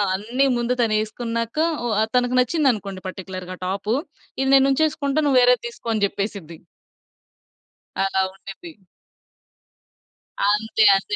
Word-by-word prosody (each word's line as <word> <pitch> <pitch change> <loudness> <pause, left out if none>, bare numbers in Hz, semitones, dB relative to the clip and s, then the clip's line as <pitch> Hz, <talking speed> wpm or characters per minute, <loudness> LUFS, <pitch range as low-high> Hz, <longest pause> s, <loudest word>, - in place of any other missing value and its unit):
అన్ని 235 +8 0
ముందు 240 +1 0
తనేసుకున్నాక 230 +2 -2 0.3
ఓ - - 0 0.3
తనకు 250 0 +2
నచ్చిందనుకోండి 235 - 0
పర్టిక్యులర్‌గా 185 -1 -7
టాప్ 195 +3 -3 0.5
ఇది 270 - +1
నేనుంచేసుకుంటా 280 +2 +2
నువ్వు 270 -3 +4
వేరేది 245 -1 +4
తీసుకో 235 0 -8
అని 215 -2 -1
చెప్పేసిద్ది. 195 -6 -6 1.4
అలా 195 0 +1
ఉండిద్ది. 195 - -11 1.8
అంతే. 220 +2 +2
అంతే. 195 - -2
225 Hz, 100 wpm, -22 LUFS, 195-255 Hz, 1.8 s, నువ్వు